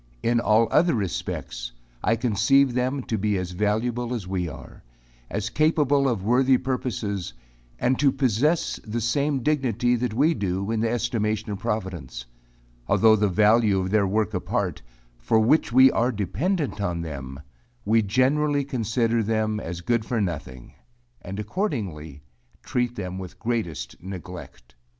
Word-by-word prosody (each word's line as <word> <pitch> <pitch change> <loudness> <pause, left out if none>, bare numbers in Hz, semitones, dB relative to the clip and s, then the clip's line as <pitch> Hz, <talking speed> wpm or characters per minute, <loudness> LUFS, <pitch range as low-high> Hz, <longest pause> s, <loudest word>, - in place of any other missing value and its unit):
In 120 0 +2
all 115 0 +3
other 170 -2 +4
respects, - - -4 0.3
I 115 - +3
conceive 120 +4 +3
them 130 +2 -1
to 110 -3 -2
be 105 0 +1
as 90 -1 -4
valuable 115 +5 -1
as 105 -6 -5
we 90 -2 -2
are 70 - -11 0.5
as 105 +1 -3
capable 145 -2 +2
of 110 -6 -2
worthy 130 +4 +4
purposes, 120 -8 -3 0.4
and 125 +1 +1
to 140 -2 +4
possess 135 +5 +1
the 110 +1 -3
same 140 +3 0
dignity 125 -5 +1
that 120 -2 -2
we 150 +7 +3
do, 100 - -2
in 115 - 0
the 115 +1 +1
estimation 110 -3 -1
of 100 - -4
providence; 90 - -4 0.6
although 110 -1 +5
the 105 0 +2
value 105 +1 +4
of 95 0 -2
their 105 -2 +3
work 110 +2 0
apart, 90 - -2 0.4
for 85 - +2
which 120 +5 +3
we 130 +2 +7
are 120 +2 +1
dependent 115 - -2
on 90 -3 -1
them, 70 -4 -7 0.5
we 110 +1 +4
generally 140 +7 +2
consider 115 -3 0
them 110 0 0
as 85 -3 -6
good 115 +5 0
for 115 +1 -2
nothing, 75 - -4 0.5
and 95 +3 -6
accordingly, 100 - -4 0.4
treat 125 -1 -1
them 95 -3 -5
with 90 -2 -9
greatest 115 -9 -3
neglect. 90 -8 -9
110 Hz, 150 wpm, -24 LUFS, 95-125 Hz, 0.6 s, we